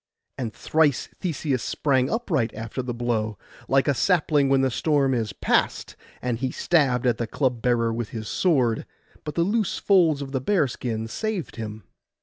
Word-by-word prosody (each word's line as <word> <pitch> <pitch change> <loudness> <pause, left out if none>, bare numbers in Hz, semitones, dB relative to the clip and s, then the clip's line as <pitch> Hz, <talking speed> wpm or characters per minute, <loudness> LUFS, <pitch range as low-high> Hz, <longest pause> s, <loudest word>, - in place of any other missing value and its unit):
And 120 -4 -4
thrice 150 +2 +1
Theseus 145 - -1
sprang 130 0 +1
upright 160 - 0
after 115 +4 -4
the 125 -1 -4
blow, 115 -3 -1 0.3
like 135 0 +3
a 145 - +4
sapling 150 -3 +2
when 135 -1 +4
the 135 -1 +1
storm 140 0 +2
is 115 -4 -1
past; 100 - 0 0.3
and 120 -2 -1
he 130 0 -1
stabbed 130 -5 +1
at 120 -3 +2
the 120 - -1
club 125 -1 -1
bearer 115 -2 +1
with 115 -1 -3
his 110 -2 -6
sword, 130 -11 +1 0.4
but 150 - -6
the 170 - +3
loose 210 +2 0
folds 165 -8 +3
of 135 - -8
the 130 -2 -1
bearskin 125 - 0
saved 205 - -4
him. 110 -2 -6
130 Hz, 170 wpm, -24 LUFS, 115-155 Hz, 0.4 s, a